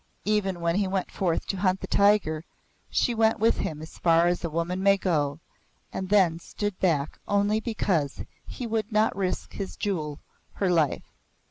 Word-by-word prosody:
Even 195 -4 0
when 170 +1 +1
he 200 -1 +1
went 190 -1 -2
forth 175 -4 -1
to 195 - -3
hunt 185 0 +1
the - - -5
tiger, 200 -6 +3 0.5
she 240 - +1
went 225 0 +3
with 225 +1 +3
him 155 -1 -3
as 160 - -12
far 165 0 +4
as 175 0 0
a 170 - -1
woman 170 +4 -2
may 195 0 +5
go, 150 -6 0 0.5
and 190 -1 -4
then 185 -5 +4
stood 205 +3 -4
back 155 -6 0
only 205 +1 +2
because 190 - -1 0.2
he 250 - -6
would 220 -1 -2
not 215 +1 +2
risk 190 -2 -2
his 195 -2 -5
jewel, 155 -7 -2 0.3
her 190 -3 0
life. 160 -5 0
185 Hz, 175 wpm, -26 LUFS, 165-205 Hz, 0.5 s, may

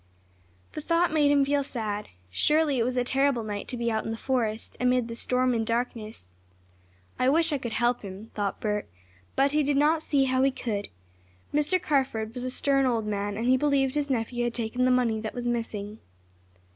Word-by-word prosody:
The 305 - -6
thought 335 +1 +1
made 295 -2 +4
him 285 -1 +4
feel 285 +1 +1
sad. 215 -6 -4 0.2
Surely 300 - +2
it - - +3
was 250 +2 -1
a 250 - +3
terrible 265 -1 +1
night 205 -1 -5
to 250 - -4
be 235 0 0
out 220 0 -1
in - - -5
the 225 - -3
forest, 230 -4 -2
amid 250 -1 +2
the 230 - -6
storm 250 +2 +1
and 225 -1 0
darkness. 225 - -3 0.9
"I 255 - +3
wish 325 +2 +3
I 285 - 0
could 235 -3 -5
help 240 +1 +1
him," 200 +2 -9
thought 205 -2 -2
Bert, 210 -1 -2 0.5
but 275 +1 +3
he 300 +1 +2
did 285 -1 +1
not 305 +2 +3
see 285 -3 +2
how 260 -1 +1
he 270 - +4
could. 220 -6 -4 0.6
Mr. 300 +5 +2
Carford 260 -9 0
was 250 - -5
a - - -1
stern 275 +1 +2
old 230 -3 0
man, 205 -1 -2
and 225 - -2
he 255 +1 +4
believed 275 -2 +2
his 295 -1 -1
nephew 240 -1 -1
had 240 - -2
taken 240 +2 0
the - - +4
money 245 -3 +2
that 220 +2 -5
was 245 -1 -3
missing. 220 -3 -3
250 Hz, 210 wpm, -27 LUFS, 225-275 Hz, 0.9 s, made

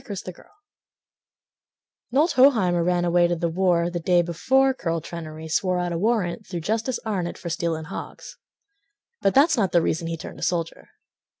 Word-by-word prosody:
Lydia 235 -6 -7 0.2
Puckett - - -18 1.7
Knowlt 300 +7 +3
Hoheimer 220 - +4
ran 175 0 +1
away 175 0 +3
to 175 - 0
the 170 0 -1
war 175 -1 +1
The 175 - -3
day 175 +1 +3
before 265 +11 +2
Curl 165 -9 -2
Trenary 160 -1 -8
Swore 180 +3 0
out 175 0 -2
a 170 - -2
warrant 215 -1 -1
through 175 -2 -5
Justice 225 +7 -1
Arnett 185 -6 -2
For 170 - -6
stealing 165 -1 -2
hogs. 175 - -9 0.8
But 195 - +1
that's 295 +2 +5
not 195 -5 +1
the 170 - +5
reason 165 +1 -1
he 165 0 -3
turned - - -9
a - - -11
soldier. 170 -1 -2
175 Hz, 175 wpm, -24 LUFS, 170-215 Hz, 1.7 s, that's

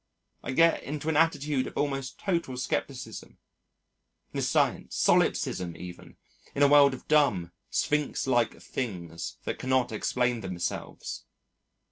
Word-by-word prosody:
I - - -4
get 165 +4 +4
into 150 +2 -4
an 160 - +1
attitude 150 -4 +2
of - - -9
almost 135 -3 -2
total 170 -9 -1
scepticism, 125 -2 -4 1.0
nescience, - - +1
solipsism 85 -2 +2
even, 90 0 -10 0.4
in 145 - +3
a - - +8
world 140 -1 +6
of - - -14
dumb, 105 - +3 0.2
sphinx 150 -1 0
like 120 -3 +1
things 85 -9 -5
that - - -4
cannot 130 -2 +1
explain 120 +2 0
themselves. 90 -2 -5
130 Hz, 120 wpm, -28 LUFS, 110-145 Hz, 1.0 s, a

